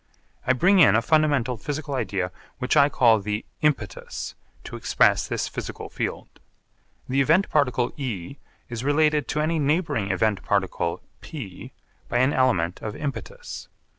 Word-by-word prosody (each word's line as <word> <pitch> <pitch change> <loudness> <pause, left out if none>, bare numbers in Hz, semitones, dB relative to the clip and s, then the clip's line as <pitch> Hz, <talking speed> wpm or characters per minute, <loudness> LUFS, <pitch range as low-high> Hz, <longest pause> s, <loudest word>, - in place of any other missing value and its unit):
I 130 - +5
bring 185 +10 +4
in 105 - +7
a 115 - +4
fundamental 145 -6 +2
physical 145 +5 -4
idea 95 -8 -1 0.3
which 125 +2 0
I 145 -1 +6
call 115 -6 +4
the 105 +2 -3 0.2
'impetus' 120 -11 -2 0.3
to - - -8
express - - +2
this - - -2
physical - - -6
field. - - -5 0.7
The 135 +2 +2
event 165 +8 +3
particle 125 -4 +1
E 125 - -5 0.3
is 120 0 -5
related 150 0 +2
to 150 - -1
any 160 +1 0
neighbouring 145 - 0
event 100 +1 +1
particle 95 -4 -1 0.2
P 110 - -8 0.4
by - - 0
an 130 +3 +3
element 95 -10 +1
of 105 0 -5
impetus. 485 - -6
130 Hz, 145 wpm, -24 LUFS, 105-150 Hz, 0.7 s, in